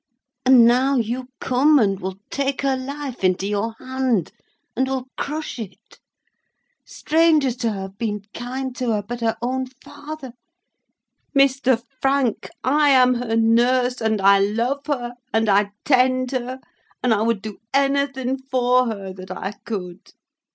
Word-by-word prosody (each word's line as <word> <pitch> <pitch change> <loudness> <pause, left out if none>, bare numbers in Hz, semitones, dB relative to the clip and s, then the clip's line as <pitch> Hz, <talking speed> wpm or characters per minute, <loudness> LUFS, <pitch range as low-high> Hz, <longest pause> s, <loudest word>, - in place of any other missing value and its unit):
And 255 -3 +8
now 255 +4 +3
you, 245 +1 -1
come 280 +4 +3
and 195 -6 +2
will 190 0 -5
take 280 0 -1
her 270 -1 +2
life 270 -2 -6
into 185 +1 +2
your 210 +2 -2
hand, 260 -8 -1 0.4
and 260 +2 +1
will 265 -1 -2
crush 300 -2 -4
it. 210 -4 -10 0.8
Strangers 310 -5 +2
to 235 -2 0
her 195 -2 -5
have 195 +1 -9
been 210 -3 -2
kind 255 +1 -5
to 245 -2 0
her; 210 -1 -1
but 240 +3 -6
her 225 -1 0
own 260 +1 -1
father—Mr. 265 -1 -3 0.2
Frank, 270 -4 +1
I 290 +3 +3
am 255 -2 +5
her 240 -2 -2
nurse, 245 +2 +3
and 220 -1 +1
I 195 0 +5
love 235 +8 -1
her, 245 -5 -2 0.2
and 225 0 +1
I 200 0 +3 0.2
tend 255 -1 +3
her, 255 0 -3 0.4
and 250 -2 +3
I 210 - +1
would 225 -3 0
do 215 -2 -7
anything 275 -1 0
for 255 -1 +2
her 200 -4 -5
that 185 0 -11
I 190 +1 -4 0.2
could. 185 -4 -6
250 Hz, 150 wpm, -22 LUFS, 220-265 Hz, 0.8 s, And